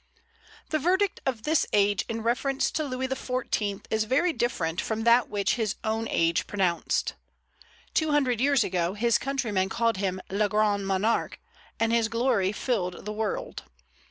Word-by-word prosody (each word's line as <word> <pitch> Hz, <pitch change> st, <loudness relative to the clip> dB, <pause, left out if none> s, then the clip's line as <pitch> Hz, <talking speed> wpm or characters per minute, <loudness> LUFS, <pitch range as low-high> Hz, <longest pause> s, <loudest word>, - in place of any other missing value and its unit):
The 310 Hz, -, +1 dB
verdict 375 Hz, +5 st, +1 dB
of 240 Hz, -5 st, -2 dB
this 310 Hz, +2 st, +2 dB
age 205 Hz, -1 st, +3 dB
in 225 Hz, -1 st, -3 dB
reference 265 Hz, +4 st, 0 dB
to 310 Hz, -, -1 dB
Louis 260 Hz, -2 st, -2 dB
XIV. 250 Hz, -6 st, -2 dB
is 220 Hz, 0 st, +1 dB
very 305 Hz, +9 st, +2 dB
different 185 Hz, -, -1 dB
from 220 Hz, 0 st, -3 dB
that 235 Hz, +1 st, +4 dB
which 200 Hz, +1 st, 0 dB
his 215 Hz, -3 st, -1 dB
own 220 Hz, +1 st, -1 dB
age 165 Hz, 0 st, +1 dB
pronounced. 185 Hz, -4 st, 0 dB, 0.8 s
Two 315 Hz, -1 st, +1 dB
hundred 265 Hz, -6 st, +2 dB
years 275 Hz, -3 st, +4 dB
ago 180 Hz, 0 st, -1 dB
his 235 Hz, +1 st, +2 dB
countrymen 230 Hz, -9 st, -1 dB
called 230 Hz, 0 st, +1 dB
him 190 Hz, -1 st, -1 dB
Le 205 Hz, +1 st, +1 dB
Grand 205 Hz, -2 st, +1 dB
Monarque, 195 Hz, +4 st, 0 dB, 0.4 s
and 225 Hz, 0 st, +2 dB
his 230 Hz, -1 st, +3 dB
glory 230 Hz, -4 st, +1 dB
filled 195 Hz, -6 st, -2 dB
the 210 Hz, -, -4 dB
world. 215 Hz, -1 st, -3 dB
225 Hz, 155 wpm, -27 LUFS, 200-255 Hz, 0.8 s, that